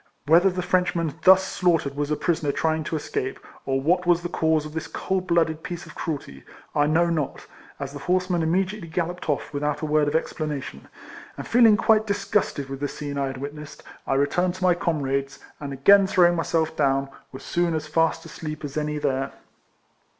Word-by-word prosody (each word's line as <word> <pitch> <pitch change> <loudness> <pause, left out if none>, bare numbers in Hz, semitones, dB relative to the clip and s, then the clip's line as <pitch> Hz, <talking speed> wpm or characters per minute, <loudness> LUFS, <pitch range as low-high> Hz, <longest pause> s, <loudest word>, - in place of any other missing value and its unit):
Whether 170 +5 +5
the 180 -1 -3
Frenchman 180 -3 0
thus 190 0 +8
slaughtered 165 -7 0
was 145 0 -2
a 150 - +1
prisoner 155 -3 0
trying 160 +1 0
to 160 - -3
escape, 135 -3 -3 0.3
or 135 0 +1
what 175 +6 +1
was 175 0 +3
the 175 - -3
cause 160 -2 +1
of 155 - -8
this 160 0 -4
cold 190 -1 -2
blooded 165 -2 +1
piece 175 +1 -6
of 155 - -12
cruelty, 140 - -5 0.3
I 145 0 +2
know 170 +2 +2
not, 155 -5 -3 0.3
as 140 -1 -5
the 145 - -7
horsemen 180 +2 0
immediately 185 +3 -1
galloped 175 +1 -3
off 145 +1 -2
without 145 0 -2
a - - -1
word 150 -1 +2
of 145 - -1
explanation; 150 - -3 0.5
and - - -6
feeling 230 -3 +6
quite 220 +1 +3
dis 200 -1 -2
gusted 145 -9 0
with 135 0 -6
the 145 - -1
scene 145 -1 -5
I 140 - 0
had 135 0 -5
witnessed, 145 +2 -8 0.2
I 135 - +1
re 140 +1 +3
turned 180 +4 0
to 185 - -7
my 180 -1 +5
comrades, 140 -5 -2 0.2
and 140 -2 -6
again 195 +9 +5
throwing 175 -3 +4
myself 160 -1 0
down, 135 -2 +1 0.2
was 130 - -10
soon 170 -1 0
as 155 - -3
fast 165 +2 0
asleep 155 -1 -7
as 145 +1 -6
any 150 0 -1
there. 135 -2 -1
160 Hz, 200 wpm, -24 LUFS, 145-175 Hz, 0.5 s, thus